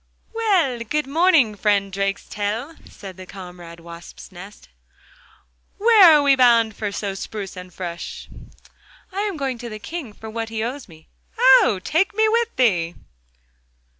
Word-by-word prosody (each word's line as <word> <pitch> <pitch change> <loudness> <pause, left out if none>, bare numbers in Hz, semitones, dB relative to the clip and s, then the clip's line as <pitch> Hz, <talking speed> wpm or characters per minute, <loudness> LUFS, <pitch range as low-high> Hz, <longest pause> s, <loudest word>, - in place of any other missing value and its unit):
'Well, 380 - +1
good 295 +7 -2
morning, 310 -5 +3
friend 200 -2 0
Drakestail,' 205 +7 -3
said 190 -2 -11
comrade 180 -3 -11
Wasp's 170 +2 -12
nest, 195 +3 -13 1.1
'where 410 -6 +7
are 290 - +1
we 280 -1 +5
bound 235 -4 +4
for 210 -1 -4
so 200 0 -4
spruce 195 0 -7
and 180 0 -10
fresh?' 170 -2 -7 0.8
'I 385 - -5
am 410 -5 -3
going 265 -4 -3
to 240 0 -7
the 215 - -7
King 280 +2 -7
for 220 - -11
what 225 +1 -5
he 220 -1 -3
owes 255 +3 -5
me.' 160 -1 -17 0.3
'Oh! 260 -6 +5
take 390 +6 0
me 440 +1 +3
with 465 +1 0
thee! 175 -9 +1
225 Hz, 145 wpm, -21 LUFS, 195-300 Hz, 1.1 s, where